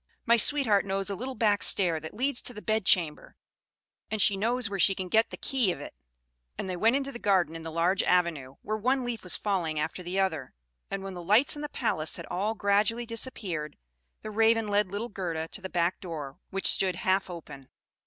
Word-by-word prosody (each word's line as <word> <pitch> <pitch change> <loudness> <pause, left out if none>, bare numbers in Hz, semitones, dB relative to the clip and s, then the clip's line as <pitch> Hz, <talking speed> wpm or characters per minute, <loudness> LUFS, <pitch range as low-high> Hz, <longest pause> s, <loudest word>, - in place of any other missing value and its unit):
My 235 - +5
sweetheart 230 -4 +4
knows 195 +1 -2
a - - -2
little 255 +6 -5
back 210 -2 +2
stair 175 -5 +3
that 160 +4 -9
leads 260 +3 0
to 245 - -2
the 210 - -8
bedchamber, 185 -8 +1 0.7
and 220 - -3
she 200 0 +5
knows 235 +4 0
where 200 -1 -4
she 195 +2 +5
can 185 -1 -5
get 220 +4 +3
the - - -8
key 250 -8 +1
of 175 - -6
it." - - -9 0.6
And - - -4
they 185 - -3
went 225 +7 +3
into 275 0 -2
the 240 - -8
garden 185 -7 +2
in 165 - -7
the 160 - -6
large 170 +4 +1
avenue, 160 -7 0
where 215 - -2
one 255 +4 0
leaf 240 -2 -4
was 180 - -1
falling 175 -7 -1
after 160 +4 -3
the 180 +2 -3
other; 160 - -1 0.3
and 195 -1 -4
when 195 -1 -6
the 175 - -7
lights 210 - +4
in 295 - -7
the 295 - -4
palace 160 - -1
had - - -8
all 210 +5 -1
gradually 210 +3 +1
disappeared, 205 - -5 0.5
the 215 - -6
Raven 225 0 +2
led 205 0 +2
little 205 +5 -4
Gerda 165 -5 -4
to 200 - -7
the 190 - -6
back 175 0 0
door, 155 -4 -7
which 195 0 -4
stood 185 -2 +3
half 190 +1 0
open. 145 -6 -10
195 Hz, 215 wpm, -28 LUFS, 175-225 Hz, 0.7 s, My